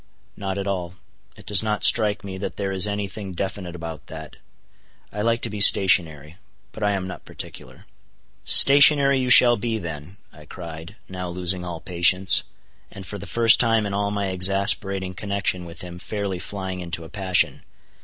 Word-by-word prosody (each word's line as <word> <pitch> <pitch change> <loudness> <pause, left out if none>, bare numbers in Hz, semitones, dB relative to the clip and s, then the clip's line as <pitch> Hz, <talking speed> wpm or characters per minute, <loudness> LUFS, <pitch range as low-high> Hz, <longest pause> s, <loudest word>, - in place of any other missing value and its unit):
"Not 95 -1 -5
at 100 - -4
all. 90 -3 -5 0.4
It - - -16
does 105 -3 +4
not 105 -1 -3
strike 105 -3 +4
me 95 -1 -8
that 100 - -6
there 100 -1 -4
is 95 0 +3
any 100 -1 -4
thing 95 -1 -9
definite 95 -1 -6
about 80 -2 -9
that. 80 -1 -11 0.8
I 105 - -5
like 115 +1 -1
to - - -2
be 105 -1 -5
stationary. 85 -6 +5 0.3
But 110 - -12
I 105 0 +1
am 95 -2 -4
not 95 - -9
particular." - - -10 0.6
"Stationary 140 0 +6
you 130 -1 -2
shall 120 -1 +6
be 115 +1 -3
then," 85 0 -9 0.2
I - - -16
cried, 85 +1 -10
now 90 -1 -7
losing 90 +1 -2
all 85 -2 -7
patience, 90 +2 +2 0.5
and - - -11
for - - -8
the - - -10
first 115 -2 +3
time 115 -3 +1
in 100 - -5
all 100 0 -2
my 100 -1 -3
exasperating 95 0 +1
connection 100 -2 -3
with 85 -1 -10
him 90 -1 -10
fairly 100 -2 -5
flying 95 -1 -6
into 85 -1 -5
a 80 - -12
passion. 95 -3 -1
95 Hz, 180 wpm, -22 LUFS, 90-105 Hz, 0.8 s, Stationary